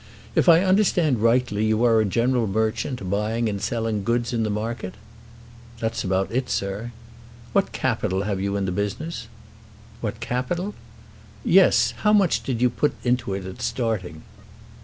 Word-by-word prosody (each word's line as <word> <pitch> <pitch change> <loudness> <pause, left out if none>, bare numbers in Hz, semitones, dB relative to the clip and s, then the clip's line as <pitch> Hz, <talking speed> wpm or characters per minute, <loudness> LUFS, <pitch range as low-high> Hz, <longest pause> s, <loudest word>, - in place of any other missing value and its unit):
If - - +3
I 170 +2 +7
understand 185 - +3
rightly 115 -2 +2
you 110 +2 +2
are 115 -2 +5
a - - +1
general 120 +3 +1
merchant, 110 +2 -1
buying 110 +4 0
and 100 -2 -3
selling 110 -1 -1
goods 120 +2 0
in 115 - 0
the 110 - 0
market?" 105 -2 -4 0.8
"That's 115 0 -2
about 95 0 0
it, 125 +2 -1
sir." 100 +4 -3 0.6
"What 200 -1 +2
capital 105 -6 -1
have 100 -2 -2
you 100 +1 -1
in 100 -1 -1
the 90 - -1
business?" 105 - -3 0.7
"What - - -4
capital?" 170 +11 -2 0.7
"Yes; - - +5
how 210 0 +2
much 195 -5 +3
did 125 -2 -2
you 125 - +5
put 150 - 0
into 125 -5 0
it 95 -1 -5
at 95 0 -8
starting?" 95 -10 -2
115 Hz, 160 wpm, -24 LUFS, 100-125 Hz, 0.8 s, I